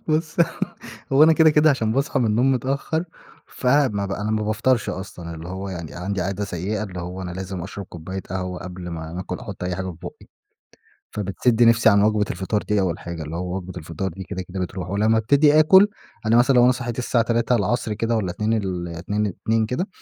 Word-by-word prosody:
بُصّ 155 0 0 0.8
هو 135 +2 +6
أنا 160 +1 +8
كده 160 0 +6
كده 155 +1 +5
عشان 115 -6 0
باصحى 135 +2 0
من 120 - +2
النوم 120 +5 +3
متأخر 135 +6 -1 0.4
فما 125 -6 +1
ب 100 - -4
أنا 105 +2 -2
ما 110 0 0
بافطرش 115 +3 +1
أصلًا 90 -3 -7
اللي 80 +2 -8
هو 95 +2 -5
يعني 85 -5 -6
عندي 95 +2 -3
عادة 100 +3 -2
سيئة 100 +3 -3
اللي 90 -4 -6
هو 90 +2 -6
أنا 90 - -5
لازم 95 0 -5
أشرب 100 +2 -7
كوباية 95 +3 -6
قهوة 90 -1 -3
قبل 90 0 -7
ما 80 -1 -6
ناكل 90 +1 -5
أحط 105 -7 -7
أي 90 0 -2
حاجة 95 0 -3
في 95 - -4
في - - -8
بُقي، - - -11 0.8
فبتسد 105 +4 0
نفسي 115 -1 +6
عن 100 -2 +5
وجبة 105 0 +3
الفطار 95 +4 -1
دي 105 -1 +1
أول 90 -3 -1
حاجة، 85 -2 -6
اللي 75 +2 -5
هو 90 +1 -3
وجبة 95 -1 -6
الفطار 85 +3 -4
دي 95 +2 -8
كده 95 0 -5
كده 95 +1 -6
بتروح، 90 0 -4
ولما 110 +3 +2
ابتدي 145 +7 +4
آكل 190 +6 +7 0.4
أنا 115 +1 +4
مثلًا 125 +3 +5
لو 120 - +7
أنا 125 - +6
صحيت 120 -2 -5
الساعة 120 -2 +1
15:00 115 -1 +1
كده 115 +2 0
والّا 100 -5 -1
14:00 105 +5 -1
ال 95 -5 -2
اتنين 95 +6 -2
اتنين 110 +3 0
كده، 130 - -2
105 Hz, 215 wpm, -23 LUFS, 90-120 Hz, 0.8 s, أنا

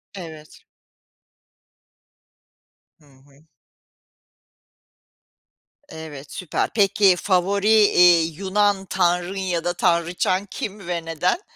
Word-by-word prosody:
Evet. 160 -5 -11 2.4
Hı 150 - -25
hı. 140 +2 -24 2.4
Evet, 150 - -10
süper. 180 -4 -3
Peki, 200 -2 +3
favori, 195 +2 0
eee, 180 -6 +5
Yunan 195 +4 -1
tanrın 180 0 -1
ya 180 -3 -2
da 175 - -1
tanrıçan 175 +2 0
kim 200 -1 -7
ve 170 -2 -4
neden? 165 - -1
180 Hz, 85 wpm, -21 LUFS, 165-195 Hz, 2.4 s, eee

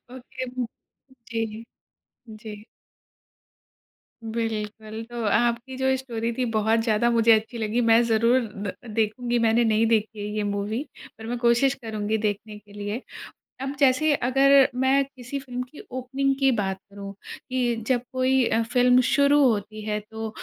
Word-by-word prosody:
Okay 260 0 -7
वू 250 -1 -3 0.7
जी, 225 -1 -3 0.7
जी। 215 -1 -10 1.6
बिल्कुल। 220 -1 -4
तो 240 -1 -5
आपकी 235 +4 +1
जो 265 0 0
ये 265 - +2
स्टोरी 235 -3 -3
थी 255 - +1
बहुत 220 +1 +2
ज़्यादा 225 +1 +2
मुझे 230 -1 +4
अच्छी 220 +2 +2
लगी। 220 +2 0
मैं 225 +1 +6
ज़रूर 230 +2 +3
द 205 -4 -5 0.2
देखूँगी, 235 +3 0
मैंने 230 +1 +3
नहीं 220 0 +3
देखी 220 -1 0
है 205 - -4
ये 210 - 0
मूवी 210 +6 -2 0.3
पर 225 - -10
मैं 245 +1 -2
कोशिश 240 +3 +3
करुँगी 215 0 -1
देखने 210 0 -3
के 205 0 -19
लिए। 205 +4 -4 0.6
अब 270 +1 -3
जैसे 280 +3 +4
अगर 275 +1 +5
मैं 275 +1 +3
किसी 270 0 -7
फ़िल्म 250 -2 -5
की 255 +4 -12
ओपनिंग 270 +2 -1
की 270 -1 +4
बात 195 -4 -1
करूँ, 200 0 -8 0.4
कि 245 -2 0
जब 250 -2 +2
कोई 260 0 +2
अ, 230 - +2
फ़िल्म 250 +2 +4
शुरू 285 0 +4
होती 215 -2 0
है 210 0 -1
तो 220 0 -5
230 Hz, 155 wpm, -25 LUFS, 215-255 Hz, 1.6 s, मैं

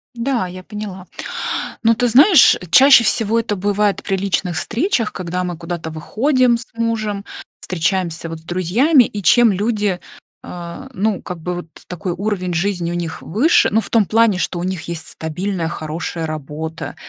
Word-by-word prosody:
Да, 235 -4 -1
я 185 +1 -9
поняла. 200 -2 -7 0.8
Но 230 0 +4
ты 245 +2 +1
знаешь, 285 - +7
чаще 265 0 +7
всего 225 +1 +2
это 210 -3 -2
бывает 205 +1 0
при 195 - -1
личных 185 -3 -1
встречах, 240 - -1
когда 180 -1 -3
мы 180 -2 -4
куда-то 170 -1 -5
выходим 240 - +1
с 235 - -7
мужем, 215 -3 -2 0.4
встречаемся 170 -1 -2
вот 165 0 -7
с - - -22
друзьями, 205 - +3
и 210 -2 -5
чем 240 +4 +5
люди, 205 -2 0 0.4
э, 175 +9 -8
ну, 210 -3 -1
как 180 -2 -7
бы 180 +2 -3
вот 175 - -6 0.2
такой 180 0 -4
уровень 185 -1 -2
жизни 175 -1 -1
у - - -3
них 170 -2 -4
выше, 235 - +3
ну, 220 - +4
в - - -8
том 225 -3 +4
плане, 220 -2 +3
что 180 -1 -2
у 175 - -3
них 185 -3 -3
есть 170 -2 -6
стабильная, 170 +2 -3
хорошая 160 +1 -4
работа, 155 +1 -6
190 Hz, 170 wpm, -19 LUFS, 170-225 Hz, 0.8 s, знаешь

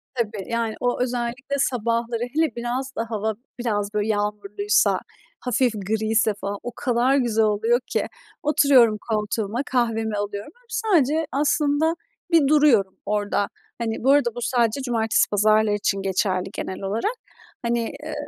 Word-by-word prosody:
Tabii, 215 -5 -2
yani, 230 -2 -1
o 245 0 0
özellikle 250 +3 -2
sabahları, 235 -2 0
hele 315 0 +1
biraz 250 +3 -3
da 225 - -1
hava 220 -1 -1 0.3
biraz, 210 -4 -1
böyle, 210 0 0
yağmurluysa, 210 - +1 0.4
hafif 250 -1 +1
griyse 220 +2 +1
falan, 200 0 -3
o 245 - -4
kadar 250 +1 +2
güzel 225 -4 +2
oluyor 220 +3 +2
ki. - - -1 0.4
Oturuyorum 270 -7 +5
koltuğuma, 215 +2 -1
kahvemi 225 -4 0
alıyorum, 205 +5 -4
böyle, - - -28 0.3
sadece 315 0 +3
aslında 295 +2 +2 0.4
bir 325 -4 +5
duruyorum 270 -11 +4
orada. 205 0 0 0.3
Hani, 225 -1 -3
bu 270 - +5
arada 245 -5 +3
bu 240 - -5
sadece 235 +1 +1
cumartesi 225 -3 +1
pazarlar 215 +1 +3
için 200 -1 0
geçerli 190 -1 0
genel 190 - -5
olarak. 220 - -1 0.5
Hani, 235 0 0 0.2
eee, - - -5
230 Hz, 140 wpm, -23 LUFS, 210-255 Hz, 0.5 s, Oturuyorum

